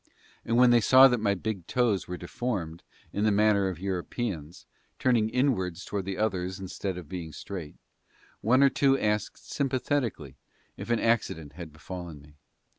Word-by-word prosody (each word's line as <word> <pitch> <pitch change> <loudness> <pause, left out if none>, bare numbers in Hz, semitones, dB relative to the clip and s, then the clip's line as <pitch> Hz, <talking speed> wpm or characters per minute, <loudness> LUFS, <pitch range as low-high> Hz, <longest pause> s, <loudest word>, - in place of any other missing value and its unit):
And 115 - 0
when 125 0 +6
they 120 -1 +5
saw 130 +4 +8
that 125 -2 +1
my 100 -2 +1
big 100 -3 -4
toes 120 -6 +1
were 90 - -5
deformed 90 -4 -4 0.3
in 100 - -1
the 110 - +4
manner 105 -1 +3
of 90 - -5
Europeans, 90 -2 -4 0.3
turning 120 -4 +2
inwards 95 -9 0
towards 100 -2 -4
the 95 -1 -3
others 95 -3 -1
instead 95 0 -4
of 90 -4 -8
being 85 -1 -6
straight, 85 -3 -7 0.7
one 130 +5 +4
or 140 - +7
two 135 0 +3
asked 105 -2 -1
sympathetically 130 - -2 0.4
if - - -8
an 120 -1 +2
accident 80 -10 0
had 85 -1 -9
befallen 85 0 -8
me. 75 +1 -18
100 Hz, 165 wpm, -28 LUFS, 90-120 Hz, 0.7 s, saw